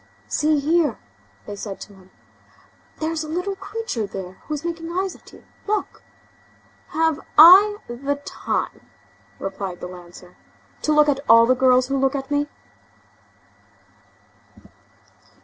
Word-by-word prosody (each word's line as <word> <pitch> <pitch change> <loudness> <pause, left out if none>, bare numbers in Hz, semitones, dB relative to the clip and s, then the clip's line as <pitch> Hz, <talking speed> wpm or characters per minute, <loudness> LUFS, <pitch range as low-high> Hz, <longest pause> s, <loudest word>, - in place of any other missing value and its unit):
"See 305 0 +1
here!" 315 +2 +1 0.5
they 205 - -7
said 200 -1 -7
to 205 - -10
him, 190 -1 -19 0.9
"there's 320 0 -2
a 310 - -8
little 360 +5 -2
creature 410 - -4
there 190 -2 -7 0.2
who 305 - -3
is 300 +3 -7
making 335 -1 -4
eyes 375 +1 -2
at - - -18
you, - - -17 0.2
look." 420 0 -2 0.9
"Have 320 -1 0 0.2
I 385 +7 +9
the 275 +4 -3
time," - - -4 0.5
replied 195 -2 -5
the - - -7
lancer, 180 0 -12 0.5
"to 305 - 0
look 300 0 +5
at 280 -2 +1
all 230 0 +8
the 255 - +4
girls 255 0 +4
who 275 - 0
look 270 +1 +1
at 270 +1 -5
me?" 290 0 +1
290 Hz, 135 wpm, -22 LUFS, 225-330 Hz, 0.9 s, I